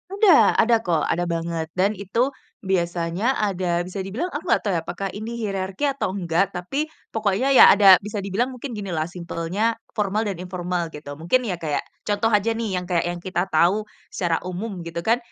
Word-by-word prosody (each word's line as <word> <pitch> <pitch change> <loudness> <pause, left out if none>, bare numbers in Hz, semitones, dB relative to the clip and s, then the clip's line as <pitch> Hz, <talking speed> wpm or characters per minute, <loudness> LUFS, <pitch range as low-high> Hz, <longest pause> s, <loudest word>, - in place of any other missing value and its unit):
Ada, 395 -4 +5
ada 230 +1 +5
kok, 165 -4 +1
ada 175 - 0
banget 165 -1 -2
dan 195 +3 +3
itu 215 +7 0 0.3
biasanya 175 +4 0
ada 180 -4 0
bisa 185 +2 -5
dibilang 235 - -3
aku 300 0 -6
nggak - - +2
tau 205 - -1
ya, - - -1
apakah 195 0 -4
ini 220 +3 -5
hirarki 195 +1 -3
atau 270 -9 -2
enggak, 180 0 0
tapi 270 +13 -2 0.2
pokoknya, 215 +4 0
ya 270 - +9
ada, 195 -2 +8
bisa 205 +1 -5
dibilang 210 +7 -1
mungkin 255 +3 -7
ginilah 175 -6 -3
simpelnya 175 +5 -2 0.2
formal 210 0 +1
dan 195 - -4
informal 180 -2 -3
gitu. 145 -1 -8
Mungkin, 175 +11 +2
ya, 180 - -2
kayak 155 -3 -2 0.2
contoh 210 +2 +1
aja, 220 +1 +2
nih, 225 -5 -2
yang 180 - -4
kayak 175 -2 +1
yang 175 - -3
kita 185 +1 -2
tau 190 +7 +2 0.2
secara 170 -3 0
umum 185 0 -5
gitu, 170 0 -4
kan, 225 +6 +2
190 Hz, 190 wpm, -23 LUFS, 175-220 Hz, 0.3 s, ya